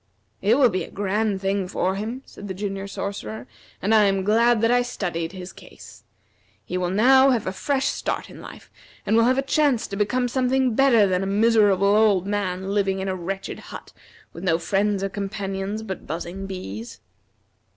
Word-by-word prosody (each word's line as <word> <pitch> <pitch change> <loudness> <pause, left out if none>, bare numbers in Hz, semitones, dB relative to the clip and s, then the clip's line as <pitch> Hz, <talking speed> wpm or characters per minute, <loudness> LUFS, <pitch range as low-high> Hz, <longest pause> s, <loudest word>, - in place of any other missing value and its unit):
"It 215 +6 +3
will 255 -5 +5
be 185 - -1
a - - -9
grand 205 0 -1
thing 195 -1 -1
for 185 +1 -1
him," 225 +7 -5
said 205 - -11
the 190 - -5
Junior 195 0 -4
Sorcerer, 120 - -5 0.4
"and 210 +3 +2
I 215 -1 +6
am 195 -1 +1
glad 230 +3 +3
that 230 +1 +3
I 245 0 +4
studied 175 -9 -3
his 185 -1 -9
case. - - -14 0.6
He 180 - -5
will 180 -1 0
now 260 +7 +5
have 240 -5 +1
a 185 - -1
fresh 270 +7 -1
start - - -2
in - - -12
life, - - -12 0.3
and 220 - +2
will 230 0 +5
have 255 +2 +3
a 270 - +1
chance 280 -4 +2
to 195 - -6
become 210 +5 0
something 255 0 +1
better 235 -4 +5
than 185 -1 0
a 195 - -2
miserable 205 -2 +3
old 210 -4 +3
man 195 -2 -2
living 195 -1 0
in 190 0 -3
a 190 - -1
wretched 190 +2 -5
hut - - -11 0.4
with 170 - -9
no 165 -3 +2
friends 195 +3 0
or 195 - -1
companions 195 +1 -4
but 190 -4 -7
buzzing 175 +4 -5
bees." 115 - -7
200 Hz, 195 wpm, -23 LUFS, 190-230 Hz, 0.6 s, I